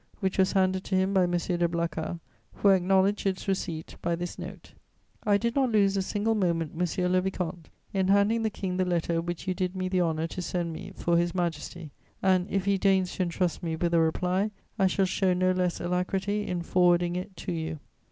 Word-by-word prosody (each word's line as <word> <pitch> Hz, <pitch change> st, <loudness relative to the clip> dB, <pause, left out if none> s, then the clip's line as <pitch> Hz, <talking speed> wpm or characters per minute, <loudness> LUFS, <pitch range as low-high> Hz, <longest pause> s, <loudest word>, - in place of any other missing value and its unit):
which 190 Hz, -1 st, -1 dB
was 190 Hz, -, +3 dB
handed 190 Hz, -1 st, +2 dB
to 190 Hz, -, -2 dB
him 190 Hz, +1 st, +2 dB
by 190 Hz, -, +4 dB
M. -, -, -2 dB
de 175 Hz, 0 st, +1 dB
Blacas, 170 Hz, 0 st, -3 dB, 0.4 s
who 200 Hz, -, +3 dB
acknowledged 195 Hz, +2 st, +3 dB
its 190 Hz, +1 st, -2 dB
receipt 170 Hz, -4 st, -3 dB
by 170 Hz, 0 st, 0 dB
this 175 Hz, +1 st, -5 dB
note: -, -, -9 dB, 0.5 s
"I 205 Hz, -1 st, +4 dB
did 235 Hz, +2 st, -1 dB
not 265 Hz, -3 st, +2 dB
lose 200 Hz, -2 st, +3 dB
a 195 Hz, -, +1 dB
single 205 Hz, +3 st, 0 dB
moment, 170 Hz, -6 st, 0 dB
monsieur 180 Hz, +1 st, 0 dB
le 185 Hz, 0 st, +3 dB
vicomte, 180 Hz, -3 st, -4 dB, 0.2 s
in 190 Hz, -1 st, +1 dB
handing 200 Hz, +4 st, +3 dB
the 220 Hz, -, +1 dB
King 190 Hz, -3 st, -4 dB
the 185 Hz, -, +2 dB
letter 170 Hz, -2 st, 0 dB
which 175 Hz, +2 st, -5 dB
you 185 Hz, -, +1 dB
did 185 Hz, 0 st, -2 dB
me 185 Hz, 0 st, -2 dB
the 185 Hz, -1 st, +2 dB
honour 160 Hz, -2 st, 0 dB
to 175 Hz, +2 st, -5 dB
send 175 Hz, -1 st, -2 dB
me 190 Hz, +4 st, -8 dB
for 170 Hz, 0 st, +1 dB
His 175 Hz, +1 st, -1 dB
Majesty 170 Hz, -2 st, -3 dB, 0.3 s
and, 185 Hz, -1 st, +3 dB
if 195 Hz, -1 st, -1 dB
he 200 Hz, -1 st, +2 dB
deigns 190 Hz, -2 st, +2 dB
to -, -, 0 dB
entrust 175 Hz, 0 st, -1 dB
me 165 Hz, -2 st, -2 dB
with 170 Hz, +1 st, -1 dB
a 170 Hz, -, +5 dB
reply, 180 Hz, +5 st, +1 dB, 0.3 s
I 190 Hz, -, +5 dB
shall 190 Hz, +1 st, +2 dB
show 185 Hz, 0 st, +1 dB
no 185 Hz, 0 st, +2 dB
less 180 Hz, -1 st, 0 dB
alacrity 190 Hz, +4 st, -1 dB
in 175 Hz, -1 st, -2 dB
forwarding 175 Hz, 0 st, +3 dB
it 185 Hz, +2 st, -5 dB
to -, -, -4 dB
you. 160 Hz, -1 st, -3 dB
185 Hz, 215 wpm, -28 LUFS, 175-195 Hz, 0.5 s, a